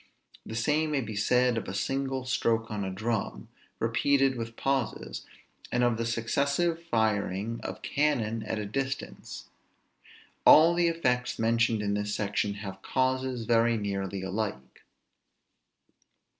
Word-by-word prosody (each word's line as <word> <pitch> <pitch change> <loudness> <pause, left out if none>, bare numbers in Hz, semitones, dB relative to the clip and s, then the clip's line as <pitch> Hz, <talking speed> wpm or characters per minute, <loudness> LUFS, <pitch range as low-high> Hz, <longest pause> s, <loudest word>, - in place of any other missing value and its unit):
The 110 - -7
same 150 +7 +1
may 145 -3 0
be 110 -3 -6
said 125 +3 +2
of - - -9
a 95 - -5
single 135 +3 -2
stroke 115 -3 0
on 105 -1 -2
a 95 - -2
drum, 100 - -3 0.3
repeated 135 +4 +2
with 115 -1 -5
pauses; 135 -2 -2 0.4
and 125 - +2
of 120 -2 +2
the 115 0 -1
successive 140 +9 0
firing 110 - 0
of - - -6
cannon 115 -7 0
at 110 +1 -3
a 105 - -3
distance. 135 +5 -5 0.9
All 165 +2 +8
the 175 0 +2
effects 125 -7 0
mentioned 115 -1 +2
in 100 0 0
this 105 0 -1
section 105 -1 -1
have 95 -1 -7
causes 130 -2 0
very 115 0 +3
nearly 100 -2 -3
alike. 95 -9 -4
115 Hz, 135 wpm, -28 LUFS, 105-130 Hz, 0.9 s, All